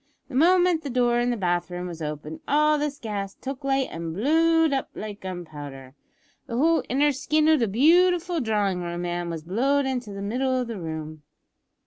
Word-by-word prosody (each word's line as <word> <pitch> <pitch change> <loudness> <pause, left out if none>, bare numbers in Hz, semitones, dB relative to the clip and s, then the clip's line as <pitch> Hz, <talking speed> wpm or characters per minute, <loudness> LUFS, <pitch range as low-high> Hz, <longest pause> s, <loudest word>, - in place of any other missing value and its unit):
The - - -11
moment 350 +3 +4
the 290 - -5
door 240 -1 +2
in 240 0 +1
the 240 - -1
bath 175 -2 0
room 180 0 -5
was 170 -2 -7
opened 150 +1 -5
all 300 +1 +3
this 290 -1 -2
gas 200 -3 -5
took 270 +1 -7
light 270 -1 +1
an' 165 0 -5
blowed 320 - +3
up 270 - -1
like 210 -1 -7
gunpowder. 145 -8 -8 0.5
The 235 - -3
whole 325 +4 +3
inner 290 +3 +3
skin 300 +3 +1
o' 315 - +6
the 240 -6 +1
beautiful 345 - +3
drawing 205 -5 0
room, 175 0 -4
ma'am, 175 0 -3
was 165 -2 -5
blowed 270 - +1
into 250 -5 -3
the 200 0 -6
middle 255 +5 0
of 250 - -1
the 230 -4 -6
room. 155 -2 -6
240 Hz, 190 wpm, -25 LUFS, 175-290 Hz, 0.5 s, o